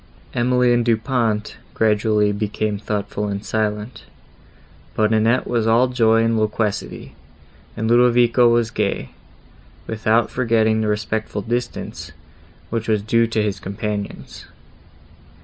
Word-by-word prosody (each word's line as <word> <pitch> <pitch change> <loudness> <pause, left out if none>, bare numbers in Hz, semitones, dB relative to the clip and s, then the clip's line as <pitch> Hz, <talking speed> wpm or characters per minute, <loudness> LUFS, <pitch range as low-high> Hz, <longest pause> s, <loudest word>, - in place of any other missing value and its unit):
Emily 125 0 +2
and 120 0 +2
Du 115 -1 +2
Pont 110 -3 -1 0.2
gradually 105 -1 +2
became 105 0 -2
thoughtful 105 0 -3
and 100 +1 -4
silent; 105 +1 -3 0.9
but 110 0 +2
Annette 115 +3 +2
was 115 -2 0
all 120 +3 +4
joy 115 -2 +3
and 115 -1 +1
loquacity, 105 -1 -2 0.6
and 110 +1 -1
Ludovico 120 0 +4
was 115 -1 +1
gay, 105 -2 -2 0.7
without 110 +1 +1
forgetting 110 -3 +1
the 110 - -1
respectful 105 0 -2
distance, 120 +3 -4 0.6
which 115 -1 -2
was 105 -2 +1
due 115 +2 +2
to 110 -1 0
his 105 -2 -2
companions. 100 0 -6
110 Hz, 120 wpm, -20 LUFS, 105-115 Hz, 0.9 s, all